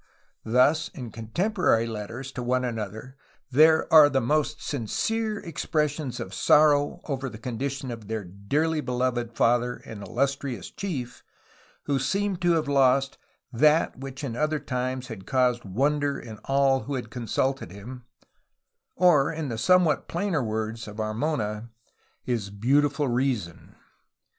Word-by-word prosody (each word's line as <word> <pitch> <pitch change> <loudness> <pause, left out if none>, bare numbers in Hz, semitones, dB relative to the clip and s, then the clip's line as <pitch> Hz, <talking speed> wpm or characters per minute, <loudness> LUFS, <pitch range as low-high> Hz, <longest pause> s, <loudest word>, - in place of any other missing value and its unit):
Thus, 130 +7 +3
in 125 -4 -7
con 110 +1 -8
temporary 180 - +1
letters 115 +4 -6
to 125 - -5
one 125 +1 0
another 115 +3 -5 0.3
there 160 +4 +5
are 155 -2 +9
the 135 -1 +1
most 150 +4 0
sincere 215 - -2
expressions 150 - -2
of 95 - -6
sorrow 145 +4 +4
over 135 -2 -3
the 110 - -10
condition 130 +3 -4
of 115 -3 -8
their 110 -1 -3
"dearly 140 - -1
beloved 125 -3 -2
father 120 +1 +2
and 110 -2 -8
illustrious 135 -2 -2
chief 130 - -5 0.6
who 140 -2 0
seemed 195 +6 -1
to 175 -1 +3
have 160 -2 0
lost 135 -1 +3 0.3
'Hhat 150 +6 +3
which 135 +1 -7
in 125 -5 -3
other 155 +3 0
times 130 -2 -3
had 100 -4 -9
caused 125 -3 +1
wonder 140 +7 0
in 110 -3 -10
all 135 -1 +2
who 140 - -3
had 120 -3 -5
consulted 130 0 -1
him" 120 +6 -9 0.9
or, 155 -6 +4
in 160 -3 -4
the 115 - -3
somewhat 180 +3 +3
plainer 175 -3 -1
words 110 0 -3
of 105 0 -9
Armona, 110 -1 -2 0.5
his 115 -5 -2
"beautiful 140 +7 +1
reason.'' 120 -9 -2
130 Hz, 140 wpm, -26 LUFS, 115-150 Hz, 0.9 s, are